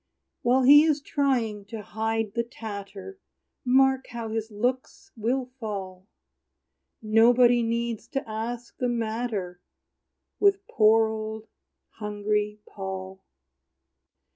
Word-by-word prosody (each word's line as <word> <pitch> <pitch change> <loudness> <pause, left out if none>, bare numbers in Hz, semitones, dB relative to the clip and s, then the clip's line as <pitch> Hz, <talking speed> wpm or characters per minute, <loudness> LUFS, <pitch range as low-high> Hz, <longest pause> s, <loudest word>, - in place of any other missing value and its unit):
While 255 +2 +3
he 290 +3 +9
is 310 -2 +2
trying 250 -8 -1
to 215 +1 -7
hide 220 0 -2
the 235 - +1
tatter, 220 - -8 0.4
Mark 265 +1 +3
how 235 -2 -6
his 220 0 -3
looks 245 +5 -3
will 250 +3 -1
fall! 190 -4 -6 1.0
Nobody 240 +3 +5
needs 235 -1 -2
to 270 -3 -4
ask 230 +2 -5
the 250 - 0
matter 220 -6 -3 0.8
With 400 0 +3
poor, 220 -1 +4
old, 220 0 -5 0.5
hungry 210 0 -2
Paul. 190 -1 -7
225 Hz, 105 wpm, -26 LUFS, 210-245 Hz, 1.0 s, he